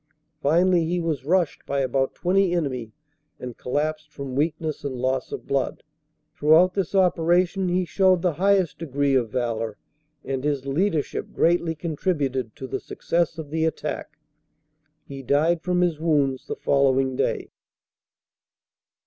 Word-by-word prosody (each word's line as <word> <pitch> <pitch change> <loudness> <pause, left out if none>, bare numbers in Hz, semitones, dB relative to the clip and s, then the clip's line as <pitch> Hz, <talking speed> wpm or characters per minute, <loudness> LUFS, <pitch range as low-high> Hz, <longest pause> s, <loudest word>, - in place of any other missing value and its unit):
Finally 170 +4 +3
he 175 +2 -1
was 160 -6 -2
rushed 175 0 +1
by 140 0 0
about 135 +1 0
20 185 0 +2
enemy 130 -9 -2 0.5
and 125 -2 -7
collapsed 155 +3 -2
from 140 -3 -6
weakness 155 +1 -1
and 140 -2 -3
loss 130 +1 -1
of - - -6
blood. 140 -1 -1 0.5
Throughout 160 +5 +5
this 195 -1 -2
operation 180 +1 +2
he 180 +1 +1
showed 185 -1 +3
the 180 -3 +2
highest 195 -5 +2
degree 140 -3 0
of 125 -4 +2
valor 115 -3 -2 0.5
and 135 -1 -3
his 145 -2 -1
leadership 155 +2 -1
greatly 170 -1 +2
contributed 145 - -2
to 130 - -7
the - - -3
success 170 -1 -1
of 155 -3 -7
the 160 0 0
attack. 160 -1 -3 0.9
He 135 -1 -8
died 155 +6 +2
from 180 0 0
his 170 -4 +1
wounds 145 -5 +1
the - - -3
following 135 -1 +2
day. - - -1
155 Hz, 140 wpm, -24 LUFS, 135-175 Hz, 0.9 s, Throughout